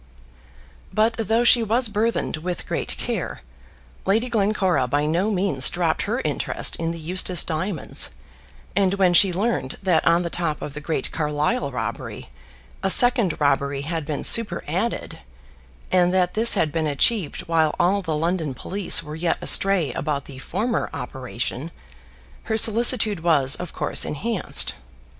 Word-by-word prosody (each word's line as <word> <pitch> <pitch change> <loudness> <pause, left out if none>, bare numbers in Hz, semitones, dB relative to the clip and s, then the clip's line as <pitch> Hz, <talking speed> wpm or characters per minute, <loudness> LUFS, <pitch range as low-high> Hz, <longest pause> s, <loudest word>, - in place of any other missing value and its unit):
But 220 +2 +2
though 225 +1 0
she 240 0 +6
was 230 +3 0
burthened 215 -4 -1
with 175 +3 -5
great - - -3
care, - - -4 0.6
Lady 225 +6 +1
Glencora 195 - +1
by 145 +3 0
no 170 +7 0
means 185 -9 +3
dropped - - -1
her - - -2
interest - - -1
in 165 0 -2
the 165 - -4
Eustace 180 +1 0
diamonds; 165 +1 0 0.7
and 195 0 +2
when 185 -3 +3
she 185 +2 +5
learned 190 - -2
that 180 -4 +2
on 170 +1 +4
the 170 - -4
top 165 -4 -2
of 145 - -7
the 150 - -7
great 150 -2 -3
Carlisle 150 - -1
robbery 125 - -5 0.5
a - - 0
second 240 - +5
robbery 140 -1 0
had 165 +1 -3
been 145 0 -4
superadded, 195 -1 +2 0.7
and 180 -1 +3
that 180 -1 +1
this 230 +2 +2
had 155 -2 +1
been 160 0 -1
achieved 155 - +1
while 160 -2 +1
all 195 +3 +2
the 160 -5 -3
London 165 -3 -2
police 195 +5 0
were 150 +1 -8
yet 165 +1 -1
astray 185 -9 +1
about 145 -3 -3
the 135 -2 -10
former 230 - -2
operation, 130 +3 -5 0.8
her 220 - -1
solicitude 220 -2 +2
was 150 -5 +3
of 180 -2 -7
course - - +1
enhanced. 225 +10 -1
175 Hz, 150 wpm, -22 LUFS, 150-205 Hz, 0.8 s, she